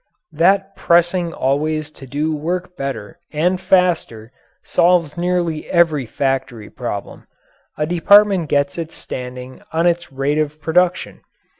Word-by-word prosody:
That 195 +5 +2
pressing 175 0 +2
always 155 +2 -1
to 135 - -12
do 150 +4 -1
work 180 +4 -3
better 135 +2 -6
and 180 +4 0
faster 170 -13 +1 0.3
solves 170 -4 +2
nearly 175 -2 -1
every 160 -7 +2
factory 135 -4 -2
problem. - - -6 0.5
A 150 - 0
department 185 0 +4
gets 140 +2 0
its 165 -1 -6
standing 125 0 -8
on 165 +1 +1
its 175 -1 0
rate 135 +3 -1
of 155 0 -2
production. 175 +3 0
160 Hz, 125 wpm, -19 LUFS, 140-175 Hz, 0.5 s, department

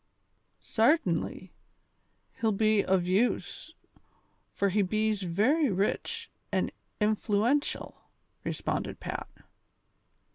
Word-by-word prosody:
'X'artainly, 220 - +1 0.9
he'll 220 -1 +2
be 215 0 +3
ov 185 -2 +3
use, 195 +7 0 0.8
fur 200 - +1
he 205 +2 +2
bees 215 +2 +1
very 225 - +2
rich 335 - -1 0.2
an' - - 0 0.3
influatiell," 215 +5 +1 0.5
responded - - -3
Pat. - - -5
215 Hz, 80 wpm, -29 LUFS, 195-235 Hz, 0.9 s, be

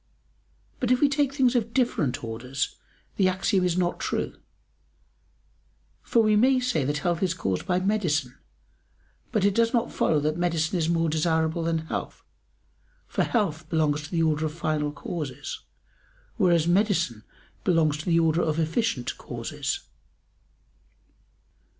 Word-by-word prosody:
But 245 - -1
if 250 0 +4
we 290 - +5
take 280 -1 +1
things 265 -3 +2
of 230 -1 -1
different 165 - 0
orders 120 +4 -3 0.4
the 190 - +4
axiom 185 +1 +1
is 180 -1 +1
not 175 -1 0
true: - - -2 1.7
for 230 - +2
we 215 -1 +4
may 255 +4 +4
say 250 - 0
that 145 +3 -1
health 170 +3 -1
is 185 -3 +1
caused 95 - -2
by 180 -1 +2
medicine, 175 -10 0 1.0
but 215 -5 +1
it 200 - +3
does 230 +3 +2
not 235 -2 +1
follow 155 - +2
that 155 +3 -1
medicine 170 -1 0
is 160 0 0
more 165 -1 +2
desirable 160 +1 +1
than 165 -1 -1
health, - - -5 0.8
for - - 0
health 165 -9 -1
belongs 150 -3 +1
to 155 - -9
the 165 -2 +1
order 155 0 +1
of 150 - -7
final 155 -3 -1
causes, 150 -2 -5 0.8
whereas 170 -3 +3
medicine 175 - +1 0.4
belongs 165 -5 +3
to 155 - -7
the 170 -1 +3
order 165 +1 +2
of 155 -2 0
efficient 165 - -1
causes. - - -4
165 Hz, 145 wpm, -26 LUFS, 155-205 Hz, 1.7 s, we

